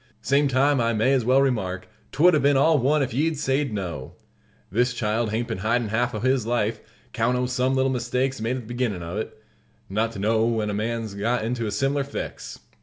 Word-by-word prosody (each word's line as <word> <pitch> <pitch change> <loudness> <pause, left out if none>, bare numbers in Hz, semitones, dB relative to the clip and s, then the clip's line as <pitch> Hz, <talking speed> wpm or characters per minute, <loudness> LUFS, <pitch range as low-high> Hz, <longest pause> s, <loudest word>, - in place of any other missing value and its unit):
Same 140 +1 +3
time, 135 0 +2
I 115 0 +1
may 115 +5 +2
as 130 -3 +2
well 130 +3 +4
remark, 95 -9 -1 0.2
'twould 175 +6 +5
'a 155 - +4
been 140 0 +3
all 155 +2 +4
one 140 +4 +2
if 130 - -3
ye'd 155 +4 0
sayed 140 -1 0
no! 85 -10 -5 0.6
This 125 +4 +1
child 110 0 0
hain't 115 +2 -2
been - - -3
hidin' 115 +2 0
half 120 +2 0
o' - - -2
his 130 -1 +1
life, 115 -2 0 0.3
'count 120 +2 +1
o' 125 - 0
some 125 +1 0
little 130 0 +2
mistakes 125 0 -1
made 115 +3 -1
at 130 - -4
the - - -14
beginnin' 115 -8 -2
of 85 +5 -4
it, 110 - -6 0.5
not 110 +3 0
to - - -8
know 110 +3 +1
when 110 -3 0
a - - -3
man's 110 0 -3
got 110 +3 -1
into 115 -1 -2
a - - -3
sim'lar 135 +6 0
fix. 140 - -7
120 Hz, 220 wpm, -24 LUFS, 110-135 Hz, 0.6 s, twould